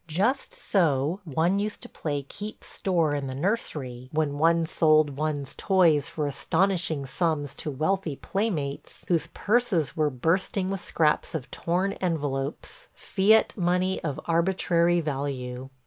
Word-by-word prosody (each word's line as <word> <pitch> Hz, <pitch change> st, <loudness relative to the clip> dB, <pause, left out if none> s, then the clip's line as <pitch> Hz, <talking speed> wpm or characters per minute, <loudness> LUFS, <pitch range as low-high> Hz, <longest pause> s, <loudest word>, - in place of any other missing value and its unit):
Just 205 Hz, -, 0 dB
so 160 Hz, -2 st, +1 dB
one 165 Hz, +6 st, +1 dB
used 210 Hz, +1 st, -3 dB
to -, -, -7 dB
play 145 Hz, -3 st, -3 dB
"keep 210 Hz, +9 st, -8 dB
store" 170 Hz, -6 st, 0 dB
in 140 Hz, -2 st, -2 dB
the 130 Hz, -, -5 dB
nursery 135 Hz, -, -3 dB
when 150 Hz, -2 st, -1 dB
one 165 Hz, +1 st, +4 dB
sold 155 Hz, -3 st, +3 dB
one's 145 Hz, -2 st, -2 dB
toys 175 Hz, -7 st, +3 dB
for 150 Hz, -, -2 dB
astonishing 165 Hz, 0 st, 0 dB
sums 145 Hz, -1 st, -1 dB
to 150 Hz, -, -5 dB
wealthy 155 Hz, +3 st, -1 dB
playmates 165 Hz, -7 st, -3 dB
whose 170 Hz, -3 st, +2 dB
purses 205 Hz, -, +1 dB
were 155 Hz, -2 st, +2 dB
bursting 185 Hz, +7 st, 0 dB
with 195 Hz, -2 st, -3 dB
scraps 160 Hz, +1 st, +1 dB
of 145 Hz, -4 st, -5 dB
torn 185 Hz, +4 st, 0 dB
envelopes 150 Hz, -, -3 dB
– -, -, -40 dB
fiat 215 Hz, +3 st, +3 dB
money 180 Hz, 0 st, 0 dB
of 150 Hz, -4 st, -3 dB
arbitrary 170 Hz, 0 st, +2 dB
value. 135 Hz, -4 st, -4 dB
160 Hz, 140 wpm, -26 LUFS, 145-185 Hz, -, one